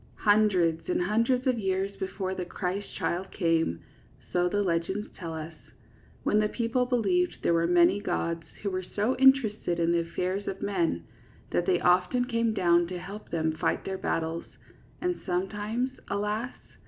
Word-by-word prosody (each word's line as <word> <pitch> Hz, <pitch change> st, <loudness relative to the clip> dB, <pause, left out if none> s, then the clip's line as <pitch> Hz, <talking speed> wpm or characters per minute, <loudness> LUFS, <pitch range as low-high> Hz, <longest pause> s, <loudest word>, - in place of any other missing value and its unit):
Hundreds 195 Hz, -7 st, +3 dB
and 180 Hz, -, +1 dB
hundreds 230 Hz, +6 st, +1 dB
of 255 Hz, -3 st, +2 dB
years 195 Hz, 0 st, -1 dB
before 190 Hz, 0 st, -3 dB
the 185 Hz, -, -3 dB
Christ 185 Hz, +3 st, -3 dB
child 185 Hz, +2 st, -2 dB
came 165 Hz, -, 0 dB, 0.2 s
— -, -, -28 dB
so 180 Hz, 0 st, +3 dB
the 205 Hz, +2 st, +1 dB
legends 185 Hz, +3 st, -1 dB
tell 165 Hz, -3 st, -6 dB
us 160 Hz, +1 st, -6 dB, 0.4 s
— -, -, -29 dB
^when 210 Hz, -, +3 dB
the 210 Hz, -, +1 dB
people 240 Hz, +2 st, 0 dB
believed 360 Hz, +9 st, +1 dB
there -, -, +3 dB
were 170 Hz, 0 st, +2 dB
many 175 Hz, +3 st, +4 dB
gods 170 Hz, -5 st, -1 dB, 0.2 s
who 200 Hz, -, -1 dB
were 185 Hz, 0 st, -1 dB
so 210 Hz, +6 st, -1 dB
interested 230 Hz, -9 st, +4 dB
in 170 Hz, 0 st, +2 dB
the 170 Hz, -, +3 dB
affairs 180 Hz, +4 st, -2 dB
of 195 Hz, -, -3 dB
men 170 Hz, -, 0 dB, 0.5 s
that 175 Hz, -, 0 dB
they 180 Hz, -2 st, +3 dB
often 180 Hz, +8 st, +3 dB
came 230 Hz, -2 st, +1 dB
down 175 Hz, -4 st, +3 dB
to 180 Hz, +1 st, -5 dB
help 195 Hz, +4 st, -8 dB
them 160 Hz, -1 st, 0 dB
fight 155 Hz, -, -1 dB
their 190 Hz, -1 st, -3 dB
battles, 165 Hz, +1 st, -2 dB, 0.6 s
and 360 Hz, 0 st, -1 dB
sometimes, 205 Hz, +7 st, -1 dB, 0.2 s
alas! 210 Hz, +4 st, -2 dB
190 Hz, 170 wpm, -28 LUFS, 175-215 Hz, 0.6 s, many